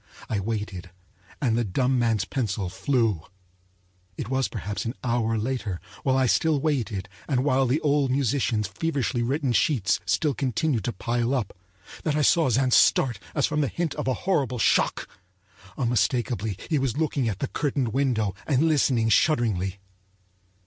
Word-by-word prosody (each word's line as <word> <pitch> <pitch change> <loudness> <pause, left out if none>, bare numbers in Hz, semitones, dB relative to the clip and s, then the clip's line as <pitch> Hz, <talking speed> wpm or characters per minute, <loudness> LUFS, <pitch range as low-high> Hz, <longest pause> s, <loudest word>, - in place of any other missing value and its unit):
I 105 - -1
waited, 100 -3 -4 0.5
and 120 -5 +1
the 120 - +1
dumb 125 +5 +1
man's 115 -4 +1
pencil 100 -7 -2
flew.It 90 - -4
was 130 0 +1
perhaps 105 -2 -4
an 115 +2 -4
hour 115 -2 0
later, 110 -5 -2 0.2
while 130 -1 +1
I 130 - +3
still 155 +4 +2
waited 120 -10 -1 0.2
and 130 -3 +1
while 135 -2 +2
the 135 +6 +1
old 145 -2 +2
musician's 125 -5 +1
feverishly 125 - -1
written 135 +1 0
sheets 115 -5 +2
still 150 -3 +1
continued 135 - -1
to - - 0
pile 120 +3 -1
up, 115 -7 -3 0.5
that 155 -2 0
I 150 - +2
saw 165 -1 +4
Zann 130 +2 +2
start 120 -7 +4 0.2
as 145 - +3
from 150 0 0
the 140 - +1
hint 170 +2 -2
of - - -4
a 130 - +1
horrible 140 - +1
shock. 110 - +2 0.7
Unmistakably 120 -4 0
he 155 -4 +1
was 130 -1 -1
looking 145 -6 0
at 100 - -3
the 140 - -2
curtained 140 -5 -1
window 115 -6 0
and 140 -1 +2
listening 130 -7 +2
shudderingly. 100 - +2
120 Hz, 155 wpm, -25 LUFS, 105-140 Hz, 0.7 s, saw